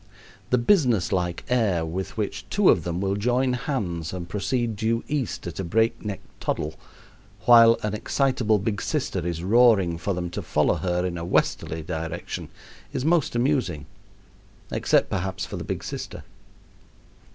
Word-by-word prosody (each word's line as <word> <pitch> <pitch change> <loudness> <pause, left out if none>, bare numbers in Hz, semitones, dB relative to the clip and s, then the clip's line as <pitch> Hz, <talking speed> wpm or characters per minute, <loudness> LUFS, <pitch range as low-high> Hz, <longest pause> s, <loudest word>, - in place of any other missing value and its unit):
The 125 - +3
business 120 - +3
like 90 -2 -1
air 105 -9 +1
with 95 +6 -5
which 105 -2 -3
two 205 -2 +4
of 85 - +1
them 85 +1 -2
will 100 0 0
join 125 +5 +1
hands 100 - -3
and 90 -2 -5
proceed 110 +4 -1
due 115 +2 0
east 145 -6 -2
at 85 0 -6
a - - -1
break 110 +6 +1
neck 105 -3 -4 0.2
toddle, 75 +1 -2 0.7
while 115 -1 +8
an 105 -1 -1
excitable 115 -1 +1
big 100 +1 -2
sister 140 -10 -1
is 85 -1 -3
roaring 100 -5 +4
for 100 +1 -1
them 90 -1 -3
to - - -4
follow - - +2
her 90 -1 -1
in 85 -2 -3
a - - -5
westerly 80 -2 0
direction, 80 +2 -5 0.4
is 130 - -3
most 160 -6 +2
amusing 120 - 0 0.9
except, - - +2
perhaps, 95 +1 -2
for - - -6
the - - -5
big - - -4
sister. - - -6
100 Hz, 160 wpm, -25 LUFS, 85-120 Hz, 0.9 s, while